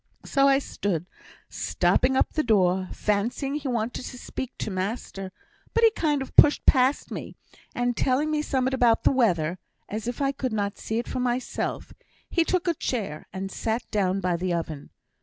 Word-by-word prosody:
So 275 -1 +3
I 275 -1 +5
stood, 195 - -2 0.4
stopping 260 +1 +1
up - - +1
the 310 - +2
door, 190 -6 +2
fancying 230 +7 -1
he 295 -1 -3
wanted 240 0 -2
to 250 - -7
speak 260 +1 -6
to 215 - -3
master; 195 0 -4 0.4
but 465 - +3
he 450 - +7
kind 300 -9 0
of - - -13
pushed 295 - +6
past 260 +2 +3
me, - - -6 0.4
and 245 0 0
telling 275 +6 +1
me 305 -1 +1
summut 265 -3 0
about 240 -3 +3
the - - +5
weather 180 - +1 0.3
(as 215 +2 -5
if 245 - -3
I 275 -1 +2
could 260 -3 -3
not 200 -2 -2
see 220 - -3
it 235 - -2
for - - -3
myself), 250 0 -2 0.4
he 335 - +3
took 360 +1 0
a 340 - +3
chair, 205 - -3
and 195 0 -5
sat 225 +4 -2
down 195 -2 +1
by 180 -2 0
the 180 +1 -2
oven. 160 -4 -5
240 Hz, 185 wpm, -26 LUFS, 195-270 Hz, 0.4 s, he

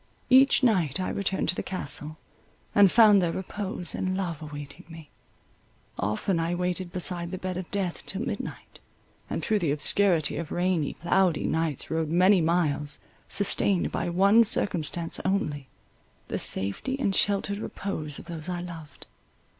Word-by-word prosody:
Each 265 +1 +6
night 185 - +2
I 185 - -2
returned 195 -1 -1
to - - +3
the - - -2
Castle, 155 -4 -2 0.6
and 200 -3 +6
found 215 -4 +6
there 170 -2 0
repose 190 -1 -4
and 185 0 -2
love 170 -5 -3
awaiting 145 -1 -9
me. 160 -2 -12 0.9
Often 110 - -1
I 165 +1 -1
waited 180 0 -2
beside 175 -1 -2
the 185 - -5
bed 185 0 -4
of 185 -1 -6
death 195 -4 -3
till 195 +4 -3
midnight, - - -6 0.5
and - - -3
through 215 -2 +1
the 170 -6 -1
obscurity 165 +2 +2
of 165 -1 -5
rainy, 175 -4 0
cloudy 175 -1 +1
nights 160 -4 -1
rode 160 -1 -1
many 180 +3 +4
miles, 155 -3 0 0.3
sustained 200 -2 +2
by - - -2
one 200 +6 +5
circumstance 175 - 0
only, 150 -8 -1 0.6
the - - -2
safety 100 - -1
and 200 -8 0
sheltered 200 0 +1
repose 155 -9 -5
of - - -10
those 170 -1 -6
I 175 -1 -3
loved. 160 -6 -10
180 Hz, 155 wpm, -27 LUFS, 160-195 Hz, 0.9 s, Each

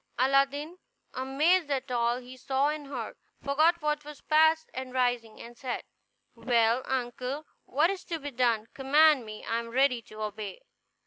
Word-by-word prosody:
Aladdin, 275 +6 +1 0.3
amazed 295 +6 +2
at 270 -2 -2
all 240 0 +1
he 250 +1 -10
saw 270 +2 0
and 300 -1 -4
heard, 245 -6 -5 0.2
forgot 310 +5 +2
what 300 0 0
was 295 -1 -10
past, 315 +1 +3
and, 260 0 -6
rising, 245 -3 0 0.2
said: 245 +1 -4 0.5
"Well, 235 0 +2
uncle, 260 +3 -3 0.2
what 310 +7 +2
is 390 -1 -6
to 335 - -3
be 290 -2 -6
done? 235 -3 +1
Command 280 -2 +4
me, 215 0 -9
I 230 - 0
am 230 0 -7
ready 255 0 +2
to 215 -2 -9
obey." 215 - -6
265 Hz, 155 wpm, -29 LUFS, 240-300 Hz, 0.5 s, Command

